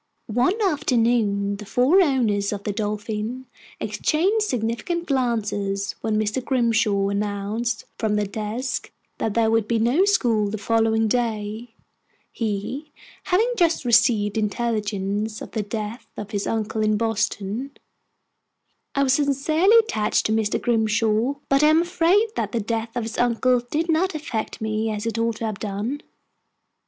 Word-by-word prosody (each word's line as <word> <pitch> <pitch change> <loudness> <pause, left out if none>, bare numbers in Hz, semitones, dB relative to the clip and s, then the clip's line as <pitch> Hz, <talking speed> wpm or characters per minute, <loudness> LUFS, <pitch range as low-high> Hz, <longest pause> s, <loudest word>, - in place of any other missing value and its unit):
One 250 - +1
afternoon 230 - +1
the 210 - -9
four 270 - +4
owners 225 - +1
of 200 -1 -4
the 210 - -1
Dolphin 215 +4 -3 0.3
exchanged 325 - +1
significant 250 - -2
glances 210 -7 -1
when 215 -1 0
Mr. 215 +4 -1
Grimshaw 225 -6 +1
announced 210 +3 -2
from 215 -2 +1
the 210 0 +1
desk 215 +6 -4 0.3
that 220 - -1
there 225 -1 +3
would 225 -2 +2
be 235 - +1
no 245 - +3
school 230 - +2
the 220 - -3
following 225 +1 +2
day, 225 0 -2 0.6
he 230 +7 -3 0.3
having 445 +7 +2
just 335 - +2
received 225 -3 +3
intelligence 210 -1 -2
of - - -9
the 220 - -1
death 215 +3 -5
of 205 0 -6
his 205 -2 -2
uncle 220 0 -1
in 215 0 +2
Boston 220 +2 -1 1.3
I 275 - +3
was 260 -1 +3
sincerely 300 - +3
attached 215 - 0
to - - +1
Mr. 220 -1 +1
Grimshaw, 225 +2 +1
but 275 +1 +3
I 300 - +6
am 315 +2 +5
afraid 365 +5 +2
that - - -2
the 235 - +1
death 225 +1 -3
of 240 - -1
his 225 0 -5
uncle 245 +1 +3
did 320 +5 0
not 335 +2 +1
affect 260 -10 -4
me 220 0 -1
as 210 0 -3
it 230 -1 -2
ought 230 0 0
to 225 - -4
have 215 -2 -4
done. 215 +7 -3
225 Hz, 150 wpm, -23 LUFS, 210-260 Hz, 1.3 s, I